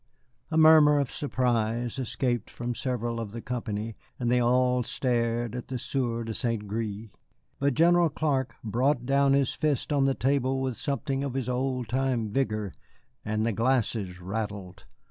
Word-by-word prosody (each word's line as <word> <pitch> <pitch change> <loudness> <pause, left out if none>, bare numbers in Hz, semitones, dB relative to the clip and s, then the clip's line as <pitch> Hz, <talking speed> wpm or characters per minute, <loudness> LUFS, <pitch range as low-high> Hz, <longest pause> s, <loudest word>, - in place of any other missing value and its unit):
A 160 - -1
murmur 155 -2 +7
of 140 -3 -1
surprise 120 -2 -1
escaped 120 -2 -1
from 120 0 -4
several 120 -2 -2
of 110 -3 -5
the 115 - -5
company, 115 -3 -4 0.3
and 120 -1 0
they 125 - +4
all 125 +1 +3
stared 120 -1 -1
at 125 - -6
the 130 - -3
Sieur 120 -2 -2
de 115 0 -4
St. 115 -2 -2
Gré. 110 0 -4 0.5
But 140 -2 +1
General 170 +1 +5
Clark 135 -5 -1
brought 120 +3 +1
down 140 +1 +3
his 140 -2 +2
fist 150 -1 -1
on 140 -2 +3
the 135 -1 +2
table 135 0 +1
with 130 -2 -2
something 140 +2 -2
of 135 -2 -3
his 130 -3 -2
old 125 -1 -1
time 125 -3 0
vigor, 105 -6 -1 0.5
and 110 0 -1
the 115 - +1
glasses 115 -6 0
rattled. 100 -1 -5
125 Hz, 165 wpm, -27 LUFS, 115-135 Hz, 0.5 s, murmur